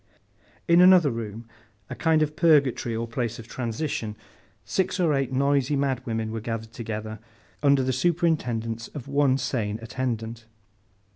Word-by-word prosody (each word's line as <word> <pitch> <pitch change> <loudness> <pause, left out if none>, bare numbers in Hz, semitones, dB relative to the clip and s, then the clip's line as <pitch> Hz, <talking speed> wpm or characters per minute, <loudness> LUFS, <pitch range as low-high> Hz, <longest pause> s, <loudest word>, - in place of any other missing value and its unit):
In 170 +1 +6
another 180 -5 +7
room, 115 0 -6 0.4
a - - -6
kind 160 -2 +2
of 150 0 -3
purgatory 145 -8 +3
or 115 +1 -3
place 115 -1 -3
of 115 - -10
transition, 115 -3 -3 0.5
six 185 - -1
or 165 -4 +3
eight 135 -2 0
noisy 140 +1 +2
madwomen 125 -5 -1
were 110 0 -4
gathered 115 0 -5
together, 110 -2 -5 0.4
under 140 -2 +4
the 130 0 0
superintendence 125 -7 0
of 140 -3 -7
one 140 -2 +2
sane 110 -6 -2
attendant. 115 -2 -4
125 Hz, 140 wpm, -25 LUFS, 115-145 Hz, 0.5 s, another